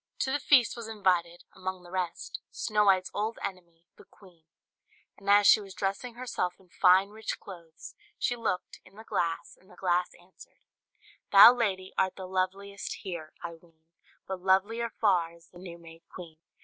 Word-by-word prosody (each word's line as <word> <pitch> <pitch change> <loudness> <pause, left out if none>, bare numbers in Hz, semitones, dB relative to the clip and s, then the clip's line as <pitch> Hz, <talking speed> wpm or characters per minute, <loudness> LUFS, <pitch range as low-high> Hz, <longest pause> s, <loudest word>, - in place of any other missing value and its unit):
To 265 - 0
the 290 - 0
feast 260 -6 +4
was 235 -2 -7
invited, 180 -5 0
among 185 -1 -5
the 175 - -14
rest, 185 -2 -4
Snow 210 -1 0
White's 185 -2 +3
old 215 +2 -2
enemy, 170 -3 -8
the - - -15
queen; 175 -5 -21 0.7
and 200 0 -8
as 205 0 +6
she 215 - +7
was 195 -2 -11
dressing 200 +6 -3
herself 235 -8 -3
in 185 -2 -24
fine, 185 +2 +4
rich 220 +1 -5
clothes, 170 -4 -12 0.2
she 245 - 0
looked, 220 -6 -3
in 190 - -20
the 220 - -11
glass, 165 -6 -2
and 185 - -24
the - - -16
glass 180 -1 0
answered, 175 +2 -18 0.7
"Thou, 205 +4 +10
lady, 195 -6 -2
art 190 -1 +1
the 190 - -7
loveliest 190 +2 -3
here, 170 -5 -6
I 170 - -5
ween; 165 -1 -22 0.4
But 190 -1 -5
lovelier 205 +5 +1
far 180 -7 +1
is 170 0 -20
the 175 - -15
new 175 -2 -9
made 165 -1 -14
queen." 165 -4 -11
185 Hz, 175 wpm, -29 LUFS, 175-205 Hz, 0.7 s, Thou